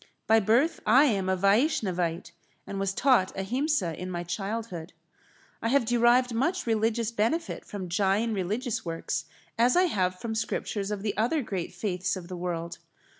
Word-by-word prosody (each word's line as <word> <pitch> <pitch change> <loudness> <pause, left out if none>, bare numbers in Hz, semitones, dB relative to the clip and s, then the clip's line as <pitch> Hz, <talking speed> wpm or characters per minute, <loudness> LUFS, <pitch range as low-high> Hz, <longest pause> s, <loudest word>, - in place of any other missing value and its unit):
By 225 0 +5
birth 235 - +2
I 255 +6 +6
am 195 -8 +1
a 190 - +1
Vaishnavite, 185 - +1 0.3
and 195 - -5
was 195 -1 0
taught 245 -3 +2
Ahimsa 225 - 0
in 180 - -4
my 175 -1 -3
childhood. 195 -1 -4 0.7
I - - -1
have 265 +1 +3
derived 240 +1 +3
much 270 +11 0
religious 225 0 +1
benefit 235 +10 -1
from 195 -3 -6
Jain 200 +5 +1
religious 210 +5 -2
works 165 -1 -3 0.3
as 245 +6 +4
I 365 - +6
have 185 - 0
from 230 -1 -4
scriptures 215 -2 -2
of 205 -2 -4
the 210 -2 -1
other 250 +7 +1
great 190 -6 -4
faiths 185 0 -2
of 180 -2 -8
the 185 - -5
world. 170 -1 -4
210 Hz, 165 wpm, -28 LUFS, 185-235 Hz, 0.7 s, I